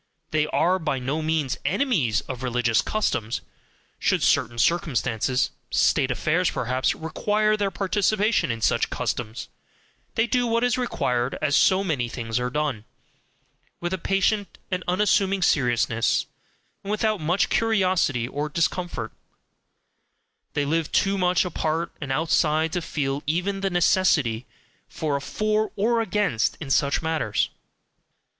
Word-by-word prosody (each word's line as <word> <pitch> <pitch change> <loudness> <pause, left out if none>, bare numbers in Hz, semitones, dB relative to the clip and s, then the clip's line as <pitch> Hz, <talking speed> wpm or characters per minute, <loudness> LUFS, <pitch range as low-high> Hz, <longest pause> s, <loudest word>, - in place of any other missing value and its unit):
They 155 -1 +1
are 185 +4 +2
by 155 -5 -1
no 135 +5 -2
means 155 -4 -1
enemies 145 - +1
of 130 -2 -7
religious 120 -2 +1
customs; 120 - -1 0.6
should - - +1
certain 120 +1 +2
circumstances, 125 -5 +1 0.2
State 135 - +2
affairs 165 +7 +1
perhaps, 130 +2 0
require 215 +6 0
their 205 -2 0
participation 200 - +1
in 115 -1 -3
such - - +2
customs, 115 -1 -3 0.7
they 225 - +3
do 245 0 +1
what 230 +1 +1
is 245 -2 +2
required, 125 - -1
as 150 -2 +1
so 190 +6 +4
many 140 -10 -1
things 115 -1 -3
are 125 0 -1
done 140 -5 -2 1.0
with 175 +1 -3
a 190 - -2
patient 195 +2 0
and 180 -1 -1
unassuming 195 0 +2
seriousness, 120 -6 +2 0.6
and 200 - -7
without 215 -2 0
much 175 +5 +1
curiosity 185 - +1
or 145 +3 -3
discomfort; 170 -6 -2 1.4
they 145 - 0
live 160 +1 -1
too 195 0 +2
much 180 -1 +2
apart 165 -1 -2
and 140 -2 -4
outside 160 +2 +1
to 180 - -1
feel 140 -3 -2
even 185 +5 -1
the 195 - 0
necessity 160 -9 +2 0.4
for 150 -3 -2
a 140 - -2
FOR 215 +7 -1
or 230 +3 +2
AGAINST 205 - 0
in 145 -4 -5
such 140 +3 +2
matters. 160 -10 0
160 Hz, 135 wpm, -24 LUFS, 130-195 Hz, 1.4 s, so